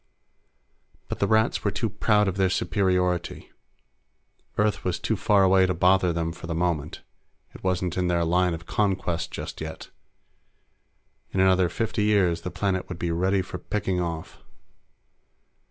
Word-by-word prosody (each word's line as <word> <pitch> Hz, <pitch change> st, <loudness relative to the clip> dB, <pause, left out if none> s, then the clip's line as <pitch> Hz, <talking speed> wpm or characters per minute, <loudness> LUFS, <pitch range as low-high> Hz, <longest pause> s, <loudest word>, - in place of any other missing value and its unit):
But -, -, -4 dB
the -, -, +2 dB
Rats 110 Hz, +1 st, +2 dB
were -, -, +2 dB
too 115 Hz, -, -2 dB
proud 105 Hz, 0 st, +2 dB
of 95 Hz, -, -1 dB
their 95 Hz, -1 st, +3 dB
superiority. 90 Hz, -2 st, 0 dB, 1.1 s
Earth 105 Hz, 0 st, +1 dB
was 90 Hz, -2 st, -1 dB
too -, -, -1 dB
far 100 Hz, -2 st, +3 dB
away 95 Hz, 0 st, +5 dB
to 90 Hz, -, -1 dB
bother 90 Hz, +1 st, +3 dB
them 85 Hz, 0 st, -2 dB
for 80 Hz, 0 st, -9 dB
the 80 Hz, -, -3 dB
moment; 85 Hz, -3 st, -2 dB, 0.5 s
it -, -, -13 dB
wasn't 90 Hz, -1 st, -1 dB
in 90 Hz, -, +1 dB
their 85 Hz, -1 st, +1 dB
line 90 Hz, +1 st, +2 dB
of 80 Hz, 0 st, -11 dB
conquest 95 Hz, -4 st, -1 dB
just -, -, -7 dB
yet. 80 Hz, 0 st, -7 dB, 1.4 s
In 95 Hz, -, -2 dB
another 95 Hz, -1 st, +4 dB
fifty 115 Hz, -1 st, -2 dB
years, 100 Hz, -5 st, +2 dB
the 90 Hz, -, -4 dB
planet 95 Hz, +1 st, -2 dB
would 90 Hz, -, -5 dB
be 85 Hz, -1 st, -2 dB
ready 95 Hz, +3 st, +1 dB
for -, -, -7 dB
picking 95 Hz, -3 st, -2 dB
off. 85 Hz, -2 st, -5 dB
90 Hz, 155 wpm, -25 LUFS, 85-95 Hz, 1.4 s, away